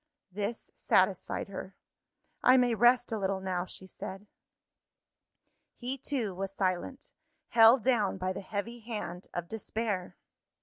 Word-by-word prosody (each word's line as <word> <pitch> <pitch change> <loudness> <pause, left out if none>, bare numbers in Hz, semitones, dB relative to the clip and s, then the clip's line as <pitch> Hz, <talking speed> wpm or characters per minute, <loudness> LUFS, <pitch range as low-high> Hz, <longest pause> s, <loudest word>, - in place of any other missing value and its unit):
This 205 +4 -4
satisfied - - +1
her. - - -7 0.7
"I 255 +1 +7
may 245 -2 +4
rest 240 +2 +4
a 220 - -1
little 195 0 0
now," 185 -2 -2
she 190 - -7
said. 190 +1 -8 1.5
He 260 +2 -4
too 240 -8 -2
was 195 +1 -4
silent; 195 +7 -2 0.4
held 230 +1 +7
down 225 -7 +2
by 185 0 -1
the 195 - -5
heavy 215 +4 -4
hand 210 -6 -6
of 175 -1 -4
despair. 215 -2 -3
210 Hz, 130 wpm, -31 LUFS, 190-240 Hz, 1.5 s, I